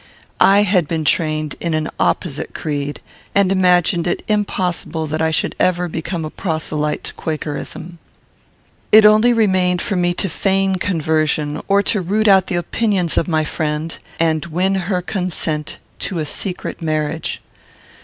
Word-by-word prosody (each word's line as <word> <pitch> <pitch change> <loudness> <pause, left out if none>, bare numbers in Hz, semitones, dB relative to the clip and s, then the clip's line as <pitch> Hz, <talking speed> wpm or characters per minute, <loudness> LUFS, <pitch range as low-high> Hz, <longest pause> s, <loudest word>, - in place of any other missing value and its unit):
I 200 +1 +6
had 185 -5 +2
been 160 -1 -2
trained 155 -5 0
in 170 -2 -1
an 155 0 -1
opposite 155 -5 -1
creed, 145 -2 -3 0.3
and 200 -1 +4
imagined 180 -2 +3
it 175 - -1
impossible 185 -6 -1
that 155 +1 -3
I 160 - +2
should 160 - -1
ever 180 -1 +2
become 165 0 -4
a 155 - -6
proselyte 155 -3 -2
to - - -6
Quakerism. 160 +2 -5 0.9
It 215 0 +8
only 215 +3 +6
remained 185 -6 +2
for 200 - -1
me 175 -1 +1
to 195 - -1
feign 195 +2 +1
conversion, 155 -4 0
or 200 0 +3
to 205 0 0
root 210 +5 +1
out 190 -2 +5
the 185 - -2
opinions 180 0 0
of - - +1
my 155 -2 +1
friend 155 +1 -2 0.2
and 160 -2 +1
win 180 +4 0
her 185 -1 -1
consent 170 -5 -2 0.2
to 185 - -3
a 155 - -1
secret 180 +5 -4
marriage. 155 0 -2
175 Hz, 155 wpm, -19 LUFS, 155-190 Hz, 0.9 s, It